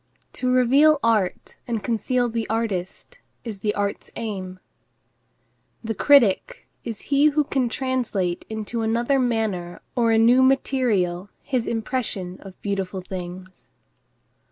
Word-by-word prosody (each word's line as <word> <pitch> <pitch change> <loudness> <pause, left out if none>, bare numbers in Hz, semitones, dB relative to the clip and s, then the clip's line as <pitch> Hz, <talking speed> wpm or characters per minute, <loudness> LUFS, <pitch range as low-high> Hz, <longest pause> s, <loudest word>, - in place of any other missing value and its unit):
To 255 -1 -1
reveal 275 +5 +5
art 215 -5 0
and 230 -3 -2
conceal 245 +1 0
the 230 -1 -3
artist 220 - -3 0.2
is 215 -5 -7
art's 200 0 -3
aim. 190 -5 -5 1.2
The 225 0 -2
critic 280 - +3 0.2
is 225 -3 -6
he 280 +2 +5
who 300 0 +2
can 265 -3 0
translate 230 -9 -1
into 220 +1 -4
another 235 +5 +1
manner 220 -8 -1 0.2
or 235 -2 +2
a 225 - +4
new 240 +3 +5
material 225 -9 +1
his 255 -4 -1
impression 220 -6 -3
of 195 -2 -12
beautiful 195 -2 -2
things. 185 0 -8
225 Hz, 120 wpm, -23 LUFS, 195-255 Hz, 1.2 s, reveal